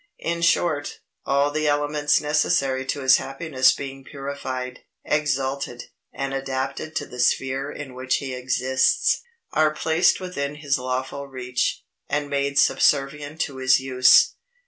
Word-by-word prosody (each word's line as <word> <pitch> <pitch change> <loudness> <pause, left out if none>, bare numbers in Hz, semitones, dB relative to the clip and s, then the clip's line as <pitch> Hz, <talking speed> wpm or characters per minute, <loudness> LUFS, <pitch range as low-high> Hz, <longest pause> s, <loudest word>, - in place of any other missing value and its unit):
In 170 0 -2
short, 155 -3 +1 0.3
all 140 +1 +2
the 155 +1 -1
elements 145 0 +2
necessary 140 -3 +1
to 145 - -2
his 130 0 +6
happiness 135 -2 +1
being 135 -1 -6
purified, 135 -3 -6 0.3
exalted, 135 -4 -2 0.2
and 135 0 -4
adapted 135 +3 -3
to - - -1
the 125 - -11
sphere 135 +3 +1
in 135 -3 -8
which 130 0 -1
he 135 -2 -5
exists, 130 +1 +1 0.3
are 155 0 +4
placed 160 +2 +2
within 150 -6 -4
his 145 -2 -1
lawful 130 +2 -3
reach, 125 -2 -2 0.3
and 145 0 -2
made 140 0 -1
subservient 145 +3 +2
to 140 -3 -3
his 130 0 +4
use. 130 -1 +5
140 Hz, 135 wpm, -23 LUFS, 130-150 Hz, 0.3 s, his